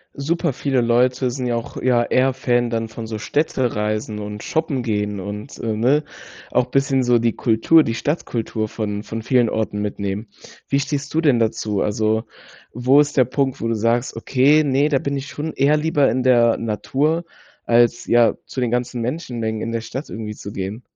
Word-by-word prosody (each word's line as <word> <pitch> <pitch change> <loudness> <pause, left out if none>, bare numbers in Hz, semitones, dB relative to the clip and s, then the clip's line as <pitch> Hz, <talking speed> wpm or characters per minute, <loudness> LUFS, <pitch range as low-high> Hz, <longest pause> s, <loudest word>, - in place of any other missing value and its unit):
Super 165 +2 -1
viele 135 0 0
Leute 125 +2 +2
sind 125 +1 -4
ja 120 - 0
auch 115 - -5
ja 125 -2 +2
eher 120 - -3
eher 130 +1 +3
Fan 120 -2 0
dann 115 0 -1
von 110 +1 -8
so 110 -1 -5
Städtereisen 110 -6 -1
und 105 0 -6
shoppen 160 -5 -1
gehen 105 -3 -2
und, 105 +6 -7
äh, 110 -2 -2
ne? 130 +7 +2 0.5
Auch 125 - +2
bisschen 135 -1 +2
so 120 -1 +3
die 115 -1 +1
Kultur, 120 +8 +4
die 115 - -2
Stadtkultur 115 -5 -2
von 105 -1 -4
von 115 +1 -5
vielen 120 -1 +2
Orten 105 -2 -2
mitnehmen. 100 +1 -3 0.4
Wie 140 - +1
stehst 140 0 -3
du 160 - +2
denn 140 -7 +4
dazu? 110 -2 0
Also, 110 +1 0 0.5
wo 130 +4 +4
ist 145 0 +1
der 130 - +6
Punkt, 135 +1 -1
wo 115 - -1
du 115 - 0
sagst, 115 +3 0
okay, 145 +4 +3
ne, 140 +1 +2
da 140 - +2
bin 140 +1 -2
ich 135 0 -4
schon 155 +2 -5
eher 140 +3 +3
lieber 150 -2 +2
in 125 +3 0
der 120 -2 +4
Natur 140 +9 -1 0.4
als, 120 0 +3
ja, 120 -1 +4
zu 130 - -4
den 120 -2 0
ganzen 125 0 -1
Menschenmengen 115 -4 -3
in 115 - -3
der 115 - -2
Stadt 135 +5 -6
irgendwie 110 -1 -5
zu 100 - -8
gehen? 100 +4 -5
120 Hz, 195 wpm, -21 LUFS, 110-135 Hz, 0.5 s, der